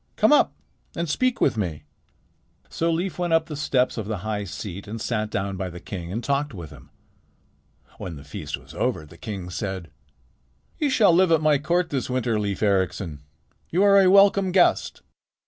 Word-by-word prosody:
Come 215 +7 +4
up - - +4 0.4
and 170 0 -2
speak 250 +11 0
with - - +2
me." 85 -8 -3 0.9
So 165 +1 0
Leif 175 +3 -2
went 175 -2 0
up 165 0 +3
the 155 - -6
steps 130 -5 0
of 105 - -5
the 110 -1 -2
high 105 -1 -2
seat 100 +1 -7
and 110 +2 -5
sat 110 -1 -2
down 100 -3 -3
by 95 0 -3
the 90 0 -9
king 85 -2 -7
and 115 +5 -3
talked 140 -1 -1
with 85 -5 -8
him. - - -14 1.1
When 85 - -6
the 70 - -11
feast 75 - -6
was - - -15
over 80 - -1
the 75 - -16
king 95 -5 -6
said: 95 -3 -4 0.9
"You 295 - +1
shall 210 -9 +5
live 180 0 +4
at 165 - +5
my 150 -2 +3
court 175 +4 0
this 135 -3 -2
winter, 125 -3 0
Leif 100 0 -2
Ericsson. 95 -6 0 0.5
You 180 +4 +2
are 200 -1 +6
a 185 - +5
welcome 195 -1 +5
guest." 180 -1 +2
115 Hz, 190 wpm, -24 LUFS, -, 1.1 s, are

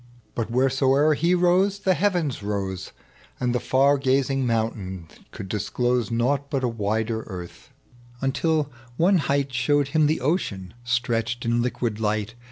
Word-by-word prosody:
But 115 -2 -3
wheresoe'er 135 +4 +3
he 170 +4 +2
rose, 180 +3 +3
the 190 -1 +2
heavens 175 - 0
rose, 100 -2 -3 0.5
And 125 -1 0
the 125 - +1
far 140 +3 +3
gazing 135 0 +1
mountain 105 -6 -2 0.2
could 95 - -8
disclose 120 +4 -1
Nought 130 +5 0
but 135 -3 -1
a - - +2
wider 110 0 -1
earth; 90 -3 -9 0.5
until 145 +2 0 0.3
one 180 +2 +4
height 140 -2 0
Showed 140 +4 +2
him 155 0 +3
tlie 155 - +1
ocean 120 - -2
stretched 120 -1 -1
in 120 0 +2
liquid 120 -3 -2
light. 110 0 -1
125 Hz, 145 wpm, -24 LUFS, 110-145 Hz, 0.5 s, one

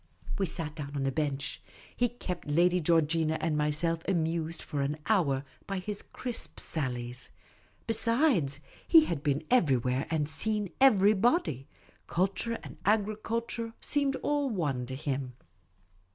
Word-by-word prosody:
We 195 - +1
sat 160 -2 -3
down 145 -1 -6
on 135 -1 -1
a 135 - +1
bench; 140 -1 -2 0.3
he 245 0 +2
kept 185 -9 -6
Lady 175 +4 +3
Georgina 160 0 +2
and 160 -1 0
myself 150 +3 +1
amused 165 -2 0
for 145 -3 -3
an 145 +2 -1
hour 150 -10 +2 0.2
by 195 - -2
his 200 +2 -3
crisp 245 -2 -4
sallies. 125 -4 -3 0.6
Besides, 225 - +2 0.3
he 325 -2 +8
had 160 - -2
been 145 +1 0
everywhere 130 - +2
and 155 -3 0
seen 210 +4 +1
every 210 -6 +6
body. 195 - +1 0.4
Culture 195 +6 0
and - - -10
agriculture 225 +2 -1
seemed 280 -2 +1
all 290 -2 +1
one 145 - -1
to 130 - -5
him. 135 -3 -3
165 Hz, 135 wpm, -30 LUFS, 145-215 Hz, 0.6 s, he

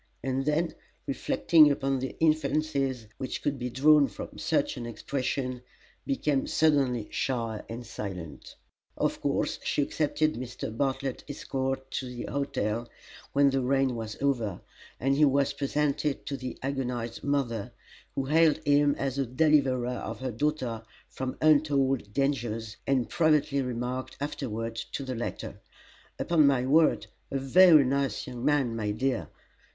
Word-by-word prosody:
And 135 0 -1
then, 155 +3 +1 0.3
reflecting 155 +3 +4
upon 135 -1 0
the 130 +1 -5
inferences 145 -5 +1
which 130 - -4
could 145 -2 -1
be 125 0 -3
drawn 145 +3 +5
from - - -9
such - - 0
an 120 -1 -6
expression, 130 +1 -3 0.5
became 150 - 0
suddenly 135 -8 +2
shy 115 -5 -2
and 120 +1 -6
silent. 95 -8 -7 0.4
Of - - -1
course - - 0
she 145 - +1
accepted 155 +1 0
Mr. 120 -2 -6
Bartlett's 135 0 -2
escort 135 -1 -3
to 130 - -3
the 125 -1 -6
hotel 120 -5 -2 0.4
when 140 0 +4
the 135 0 +1
rain 135 0 +1
was 110 -2 -5
over, 115 -10 0 0.4
and 135 +2 +2
he 150 - +3
was 140 0 +2
presented 145 +1 -1
to 140 - -3
the 130 -1 -6
agonised 125 -4 -3
mother, 125 -7 -1 0.4
who 135 - -1
hailed 155 +2 +4
him 145 0 +4
as 135 0 -2
a 135 - +1
deliverer 130 -2 +3
of 110 0 -6
her 130 -1 -3
daughter 125 -2 -1 0.3
from 130 -1 -5
untold 140 -7 +3
dangers, 115 -5 -1
and 130 -3 +2
privately 150 -4 +2
remarked, 125 +1 -4
afterward, 115 -5 -4 0.2
to 140 - -3
the 130 -1 -4
latter: 120 -1 -5 0.6
"Upon 160 -4 +3
my 130 -3 +2
word, 155 +4 +4 0.2
a 135 - -1
very 155 +2 +6
nice 135 +1 0
young 125 -2 -7
man, 140 -5 +2
my 105 -2 -2
dear!" 125 +4 -1
135 Hz, 145 wpm, -28 LUFS, 125-145 Hz, 0.6 s, very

